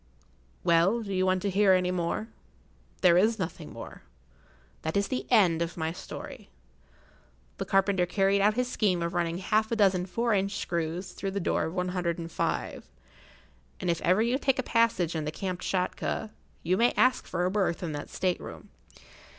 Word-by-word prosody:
Well, 190 +8 +3
do 200 -2 -5
you 185 0 +1
want 185 -1 +1
to 200 - +1
hear 195 0 +4
any 180 -1 +2
more? 180 +4 -2 0.7
There 180 -2 +6
is 220 +3 +3
nothing 175 -4 -5
more. - - -9 0.8
That 160 +4 -2
is 200 - 0
the 260 - -3
end 185 -9 +4
of 170 +1 -3
my 160 -1 -1
story. 170 - -9 1.1
The - - -2
carpenter 195 -2 +2
carried 195 +1 +2
out 210 +2 +3
his 250 0 0
scheme 195 -8 +1
of 170 +2 -2
running 170 -1 -1
half 215 +4 0
a - - +2
dozen 190 -4 +2
four 230 +5 0
inch 200 0 0
screws 170 +2 -3
through 195 - -4
the 200 +1 -2
door 170 - 0
of 160 +3 -5
one 180 0 -1
hundred 175 -2 -1
and 165 -1 -6
five; - - -3 0.9
and 175 - 0
if 170 - -3
ever 185 +5 +3
you 245 +3 +1
take 270 -2 +1
a 260 - 0
passage 225 -9 +1
in 155 -1 -2
the 155 - -2
Kamtschatka, 185 +4 -2 0.3
you 180 +3 +1
may 235 +3 +3
ask 255 0 +2
for 175 0 -1
a 185 - 0
berth 190 -4 0
in 165 - -3
that 145 -1 -6
state 180 -1 -1
room. - - -10
185 Hz, 190 wpm, -28 LUFS, 170-205 Hz, 1.1 s, There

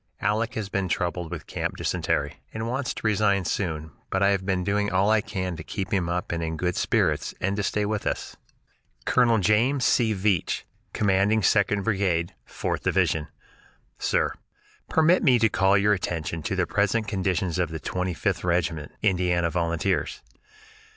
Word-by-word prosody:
"Aleck 110 +4 0
has 110 -4 -3
been 100 -1 -1
troubled 85 -1 -2
with 85 -3 -6
camp - - -3
dysentery, - - -1 0.2
and 110 +1 -3
wants 130 +2 -2
to - - -7
resign 105 -3 +2
soon 80 -5 -2 0.2
but 95 +1 +1
I 100 - +5
have 100 -2 +1
been 95 -1 0
doing 100 +1 0
all 95 +3 +3
I 110 -1 +4
can 95 -4 -4
to - - -7
keep 95 -2 -4
him 90 -3 +1
up 90 +1 -2
and 85 -1 -2
in 80 0 -3
good 90 +2 -1
spirits, - - 0
and 100 +2 0
to 105 - -1
stay 105 +1 0
with 105 0 -2
us." - - -3 0.7
Col. 120 -3 +4
James 115 +7 +2
C. 115 -2 +3
Veatch, 95 -3 0 0.3
Commanding 100 +2 +2
Second 100 0 +3
Brigade, 95 -4 0
Fourth - - -3
Division. 80 -1 +1 0.7
Sir: - - +1 0.6
Permit 160 +3 +4
me 130 -6 +5
to 110 -1 +3
call 95 0 +3
your 105 +1 +3
attention 85 -3 -3
to - - -2
the - - +1
present 105 +2 +1
condition 95 -3 0
of 85 - -1
the 80 0 -5
Twenty 90 +2 -2
fifth - - -1
Regiment, 85 -4 -1
Indiana 90 -4 +2
Volunteers. 85 +3 -1
95 Hz, 170 wpm, -25 LUFS, 90-105 Hz, 0.7 s, I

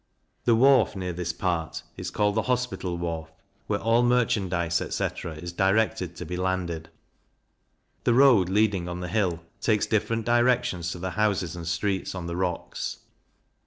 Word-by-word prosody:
The 115 - +5
wharf 130 -2 +5
near 90 -2 -3
this 85 0 -2
part, 85 -2 -2
is - - -5
called 105 0 +1
the 110 - +1
Hospital 125 -8 -1
Wharf, 80 -2 -4 0.4
where 105 - +1
all 115 +1 +3
merchandize, 95 -9 +1
etc. 85 - -3
is 85 +3 -7
directed 95 -1 +1
to 90 - -6
be 90 - -4
landed. 90 -3 -2 1.2
The 120 - +4
Road 125 -9 +6
leading 100 -3 +1
on 90 0 -4
the 90 - -3
hill, 90 -5 0 0.2
takes 105 -3 +2
different 115 +1 0
directions 120 -7 +2
to - - -7
the 95 +1 -4
houses 100 -5 0
and 85 -2 -7
streets 95 +3 -1
on 90 -2 -5
the 85 0 -4
rocks. 90 -1 -3
95 Hz, 160 wpm, -26 LUFS, 85-110 Hz, 1.2 s, Road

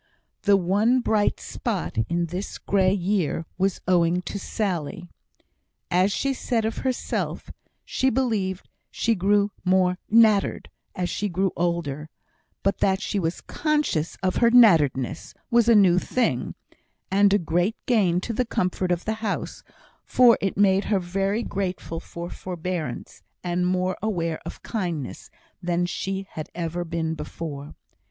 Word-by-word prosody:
The 200 -1 +4
one 200 +6 +2
happy 255 - +3
bright 210 -2 +1
spot 80 +2 -3
in 170 0 0
this 180 +4 -5
grey 190 -2 +2
year 185 -4 0
was 195 0 0
owing 175 0 +3
to 200 - -5
Sally. 180 -3 -3 0.8
As 185 +3 +3
she 275 +6 0
said 235 -3 -1
of 220 - -2
herself, 260 -2 -2 0.3
she 265 - +1
believed 215 -8 -1 0.2
she 230 - 0
grew 205 +1 +2
more 180 0 +2
"nattered" 215 -3 +3 0.2
as 180 -1 -1
she 205 +3 -2
grew 190 +1 0
older; 165 -4 -2 0.5
but 195 - +1
that 190 -1 +2
she 205 - -2
was 165 -1 -2
conscious 300 - -1
of 185 - +1
her 235 - +5
"natteredness" 160 - +4 0.2
was 235 -1 +4
a 230 - +7
new 185 -4 +6
thing, 250 +5 -1 0.6
and 200 +1 +4
a 205 - +5
great 175 +4 0
gain 195 -8 +3
to 230 - -3
the 250 - +1
comfort 185 -5 -1
of 175 0 -1
the 220 - 0
house, 215 -3 -3 0.4
for 245 -2 +5
it 195 - -1
made 195 -1 +4
her 205 - +2
very 195 +5 -1
grateful 180 -5 -3
for 170 0 -7
forbearance, 175 -6 -5 0.2
and 180 0 0
more 185 0 0
aware 170 -7 -1
of - - -9
kindness 170 - -4 0.3
than 175 0 0
she 195 +2 -3
had 155 - -6
ever 175 0 -3
been 165 -1 -2
before. 150 -2 -7
185 Hz, 145 wpm, -24 LUFS, 170-205 Hz, 0.8 s, a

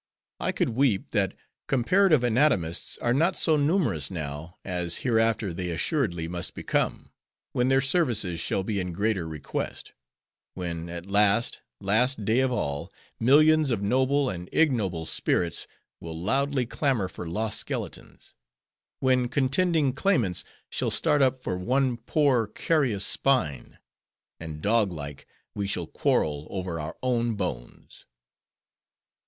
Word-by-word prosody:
I - - 0
could - - 0
weep 115 -4 +1
that 100 -4 0 0.3
Comparative 155 +3 +3
Anatomists 115 - +1
are 120 - +2
not 165 +8 +2
so 160 - +4
numerous 145 - +1
now, 80 0 -6
as 90 -3 0
hereafter 115 -5 +1
they 90 +1 -4
assuredly 85 - -1
must 85 0 -4
become; - - -2 0.4
when 125 0 +1
their 135 0 +4
services 120 - +1
shall 95 - -1
be 100 0 -2
in 90 -2 -3
greater 100 -2 0
request; 75 -3 -5 0.6
when, 85 -2 -4
at 85 0 -6
the 100 - -12
last, 105 +3 +3 0.2
last 110 +3 +2
day 110 +4 +3
of 130 -1 +2
all, 70 -12 -2 0.3
millions 155 +4 +5
of 110 -5 -1
noble 130 +6 +2
and 90 -5 -5
ignoble 105 - +1
spirits 85 +1 -1 0.3
will 80 -1 -7
loudly 135 +7 +1
clamor 125 -5 0
for 90 - -8
lost 110 +5 -2
skeletons; - - -6 0.7
when 130 -1 +3
contending 145 +2 +1
claimants 125 - +1 0.3
shall - - -1
start 145 -1 +2
up 130 -1 +2
for - - -2
one 130 +5 +1
poor, 125 -1 +1
carious 120 -3 +1
spine; 100 - 0 0.6
and, 80 -2 -7
dog 105 -2 +3
like, 75 -4 -7 0.3
we 100 -1 -3
shall - - -3
quarrel 75 0 0
over 90 -3 -4
our 75 +1 -6
own 120 -2 +1
bones." 80 -12 -6
110 Hz, 135 wpm, -26 LUFS, 90-135 Hz, 0.7 s, millions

